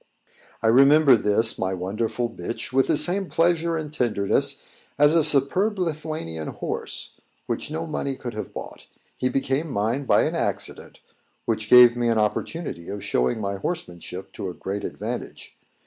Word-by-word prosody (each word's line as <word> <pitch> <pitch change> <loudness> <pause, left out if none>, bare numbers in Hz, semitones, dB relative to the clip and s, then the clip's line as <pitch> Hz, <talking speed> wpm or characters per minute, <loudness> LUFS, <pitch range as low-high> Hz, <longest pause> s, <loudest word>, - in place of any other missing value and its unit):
I - - +3
remember 135 +3 +6
this, 110 +1 +2
my 95 0 -1
wonderful 110 +6 -2
bitch, 115 +3 -6
with 135 0 +3
the 160 - +2
same 180 +5 +1
pleasure 165 0 +1
and 155 -2 -6
tenderness 110 -8 +1 0.4
as 145 +1 +5
a 165 -1 +4
superb 185 +11 +3
Lithuanian 155 - -4
horse, - - -5 0.3
which - - -3
no 160 +2 -4
money 140 -3 -3
could 120 -2 -7
have 110 - -6
bought. - - -9 0.3
He 130 - -1
became 135 +4 -1
mine 120 +4 -1
by - - +4
an - - -1
accident, - - -2 0.4
which 110 -2 -2
gave 125 -1 +8
me 120 -1 0
an 115 -1 +2
opportunity 105 - -2
of 100 0 -6
showing 65 - 0
my 100 -1 -3
horsemanship 95 - -6
to 95 - -5
a 90 - -8
great 100 +1 -5
advantage. - - -6
125 Hz, 160 wpm, -24 LUFS, 105-155 Hz, 0.4 s, gave